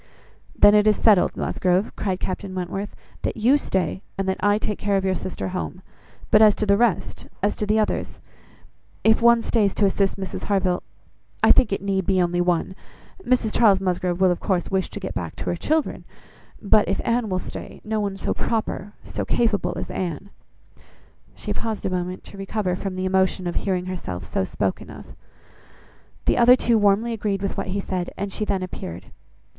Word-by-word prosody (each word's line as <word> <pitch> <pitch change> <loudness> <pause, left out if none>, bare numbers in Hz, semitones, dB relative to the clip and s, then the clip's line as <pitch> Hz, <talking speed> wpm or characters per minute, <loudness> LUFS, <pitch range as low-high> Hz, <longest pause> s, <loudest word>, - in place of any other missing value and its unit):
"Then 205 - +7
it 210 0 +5
is 210 - +5
settled, 205 -5 +3
Musgrove," 185 +3 0
cried 190 -3 -2
Captain 185 0 -4
Wentworth, 185 +3 -4 0.3
"that - - -2
you 240 +6 +4
stay, 190 -8 -1 0.2
and 195 0 -2
that 190 - -1
I 205 +1 +3
take 210 -1 -3
care 200 -1 +1
of 190 - -1
your 190 - +2
sister 185 0 -4
home. 185 0 -5 0.5
But 210 - +6
as 215 -2 +7
to 215 - -1
the 200 -1 +4
rest, 230 -2 0 0.2
as 205 - +2
to 210 - -2
the 215 +1 +2
others, 215 - -1 0.8
if 220 +1 +4
one 235 0 +5
stays 210 -4 +1
to 205 - +3
assist 195 0 +1
Mrs 190 -1 -5
Harville, 190 -3 +1 0.6
I - - +7
think 250 - +5
it 195 - -2
need 195 -2 -1
be 190 -1 +3
only 175 0 +1
one. 175 +1 0 0.5
Mrs 245 -3 +1
Charles 205 -5 +5
Musgrove 180 -1 -1
will, 185 -1 +4
of 175 - -1
course, 185 -3 -1
wish 190 -1 0
to - - -7
get 190 - -5
back 85 -3 -4
to 85 - -7
her - - -1
children; 315 - -1 0.6
but 210 0 +3
if - - 0
Anne 230 -2 +1
will 185 - 0
stay, - - -7
no 215 0 -1
one 200 -2 -2
so - - -1
proper, 215 -3 -3
so - - -4
capable 205 -7 0
as - - -5
Anne." 185 +2 -4 1.0
She - - -4
paused 220 -2 -4
a 190 - 0
moment 180 0 -3
to 200 - -12
recover 195 -2 -2
from 190 0 -4
the 185 0 -2
emotion 190 0 +1
of 175 - -2
hearing 185 -1 -1
herself 175 - -5
so - - -2
spoken 95 -1 -3
of. - - -11 1.1
The - - +2
other 245 +1 +8
two 235 -3 +2
warmly 210 +3 +2
agreed 200 -3 -2
with 195 - -2
what - - -3
he 195 +2 -2
said, 185 -2 -3
and 200 0 -3
she 215 - -2
then 195 -3 -1
appeared. 85 - -7
195 Hz, 195 wpm, -23 LUFS, 185-210 Hz, 1.1 s, other